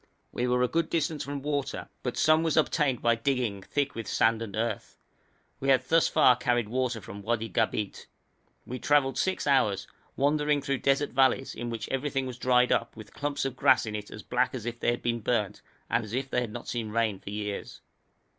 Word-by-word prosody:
We 125 - -1
were 125 0 +2
a - - +3
good 165 +5 0
distance 160 -2 -1
from 140 -1 -5
water, 145 -2 -2
but 125 - -3
some 155 0 +4
was 165 -1 0
obtained 150 -4 +2
by 115 - +4
digging, 115 -4 -1
thick 140 +7 -1
with 115 -2 -6
sand 115 +1 +2
and 105 -4 -5
earth. 110 -1 -3 0.6
We 135 - -1
had 130 -1 +4
thus 165 0 +4
far 125 - +5
carried 120 -3 0
water 125 -1 -1
from 100 0 -9
Wadi 115 +1 -1
Gabeit. 105 -1 -1 0.6
We 125 +1 -6
travelled 145 -2 +2
six 190 0 0
hours, 105 -9 +2 0.3
wandering 150 0 +1
through 140 -2 -1
desert 140 +1 +1
valleys, 135 0 +2
in 120 +1 -5
which 115 -2 -4
everything 135 0 -1
was 125 -1 -7
dried 125 0 +3
up, - - 0
with 110 -2 -12
clumps 145 -1 -2
of 135 -2 -3
grass 130 - +4
in 105 -1 -4
it 105 -1 -6
as 105 - -9
black 125 +1 0
as 115 -4 -6
if 120 0 -4
they - - +1
had 120 - -1
been 120 -1 0
burnt, 105 -2 -1 0.3
and 115 - +1
as 105 0 -9
if 130 +1 -2
they 125 - +1
had 120 -3 -4
not 120 +2 -8
seen 115 -3 -3
rain 110 -3 0
for - - -9
years. 105 0 -5
125 Hz, 210 wpm, -28 LUFS, 115-140 Hz, 0.6 s, far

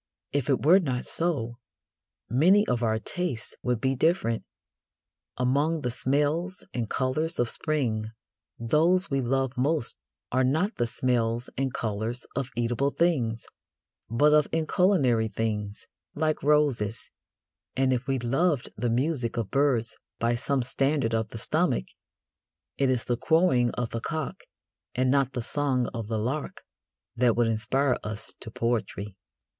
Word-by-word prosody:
If 140 -1 -1
it 135 0 +1
were 180 +5 +7
not 130 -8 -2
so, 120 -9 -2 0.7
many 180 - +4
of 125 -1 0
our 110 -2 +1
tastes 130 0 -3
would 125 -2 0
be 135 +1 +1
different. 130 -6 +1 0.9
Among 145 +6 +1
the 125 -2 -1
smells 150 +9 0
and 115 -3 -2
colours 155 +6 -1
of 120 -1 +1
spring 125 -9 -1 0.5
those 165 +10 +2
we 135 0 +1
love 130 +1 0
most 140 +1 +1 0.4
are 130 +1 +2
not 160 - +1
the 120 - +1
smells 120 -1 0
and 135 0 -1
colours 115 +2 -3
of 135 -2 -2
eatable 120 +4 +1
things, 130 -9 0 0.6
but 145 +7 +4
of 150 -1 +5
inculinary 155 - +2
things, 105 -2 -3 0.3
like 155 0 0
roses, 140 -8 +1 0.6
and 130 0 +2
if 125 +2 -2
we 135 -1 +1
loved 135 +4 +1
the 120 - -1
music 125 -1 0
of 110 -4 -2
birds 130 -5 +1 0.2
by 115 +1 +1
some 135 +2 0
standard 135 -1 0
of 110 -1 0
the 115 - -7
stomach, 145 +3 +1 0.9
it 135 -1 +1
is 125 -3 +1
the 120 - -1
crowing 160 -5 +3
of 120 -2 -2
the 115 - -3
cock 155 +3 -4 0.5
and 130 0 +2
not 135 -1 +2
the 125 -2 -3
song 130 -2 0
of 115 -3 -4
the 110 0 -1
lark 130 +7 -3 0.5
that 120 -1 +3
would 120 - +3
inspire 125 +5 +1
us 110 0 -5
to - - -6
poetry. 110 -3 -2
130 Hz, 145 wpm, -27 LUFS, 115-150 Hz, 0.9 s, were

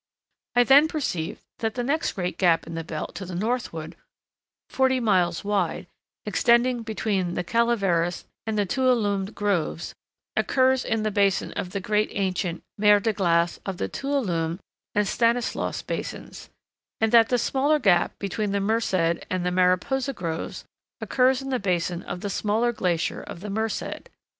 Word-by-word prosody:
I 245 - +6
then 280 +5 +6
perceived 255 - -3 0.2
that 225 -1 -2
the 245 - -1
next 310 +6 0
great 180 -2 -3
gap 170 -3 +3
in 165 - -8
the 165 0 -4
belt 160 -1 -5
to 200 - -6
the 180 -1 -6
northward, 190 -6 -3 0.7
forty 260 -1 +2
miles 185 -7 +1
wide, 195 -3 -1 0.4
extending 235 +3 +3
between 210 -5 -1
the - - -1
Calaveras 195 -6 +1 0.2
and 220 -1 -1
Tuolumne 205 -2 +1
groves, 190 -5 -1 0.4
occurs 260 -1 +2
in 225 -1 -1
the 215 - 0
basin 200 -1 +1
of 180 - -4
the 200 - -3
great 210 +2 +1
ancient 185 -3 -2 0.2
mer 210 0 +6
de 220 +2 0
glace 170 -3 +1
of 195 -2 -4
the - - -2
Tuolumne 185 -12 -1 0.4
and 210 -1 +2
Stanislaus 235 +3 0
basins, - - -6 0.5
and 220 0 +2
that 230 -1 +6
the 245 - +3
smaller 275 +5 +2
gap 195 -11 +2
between 200 +1 -2
the 200 - +1
Merced 220 +2 0 0.4
and 185 -1 -1
Mariposa 185 +10 +2
groves 165 -7 -5 0.3
occurs 260 +1 +2
in 270 - -5
the 255 -2 0
basin 175 -2 -1
of 180 - -6
the 205 - -3
smaller 220 +5 +1
glacier 180 -7 -1
of 170 - -9
the 205 0 -5
Merced. 220 +1 -3
205 Hz, 155 wpm, -25 LUFS, 180-240 Hz, 0.7 s, I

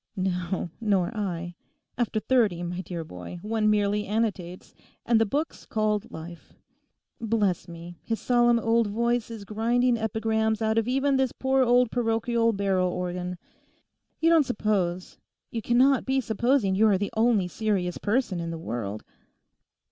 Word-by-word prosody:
'No, 180 -2 -2
nor 200 -1 +1
I; 175 -4 -3 0.4
after 230 -2 -1
thirty, 215 -8 +1
my 175 +1 -4
dear 175 -3 -5
boy, 90 - -9
one 215 0 +1
merely 210 0 +1
annotates, 200 -5 -3 0.3
and 230 -2 +3
the 225 - +2
book's 295 +9 -3
called 215 0 -1
Life. 170 +1 -10 0.6
Bless 210 -6 0
me, 170 0 -10
his 225 -1 -3
solemn 240 -1 +3
old 230 -1 +2
voice 235 +2 0
is 220 -3 -8
grinding 235 +4 +1
epigrams 220 0 0
out 220 0 +1
of 225 - -2
even 270 +2 +2
this 265 -2 +1
poor 265 0 +1
old 245 -1 +3
parochial 230 0 +1
barrel 195 -3 +1
organ. 180 0 -4 0.8
You 330 +1 +3
don't 330 -1 +6
suppose, 200 -7 -2 0.3
you 230 - -3
cannot 255 +4 +3
be 265 0 +2
supposing 235 -2 +1
you 215 +3 +4
are 200 -3 +4
the 205 +1 -3
only 220 -4 +3
serious 185 -2 -1
person 210 -4 0
in 170 0 -4
the 165 - -4
world? 110 -9 -5
215 Hz, 150 wpm, -26 LUFS, 180-235 Hz, 0.8 s, don't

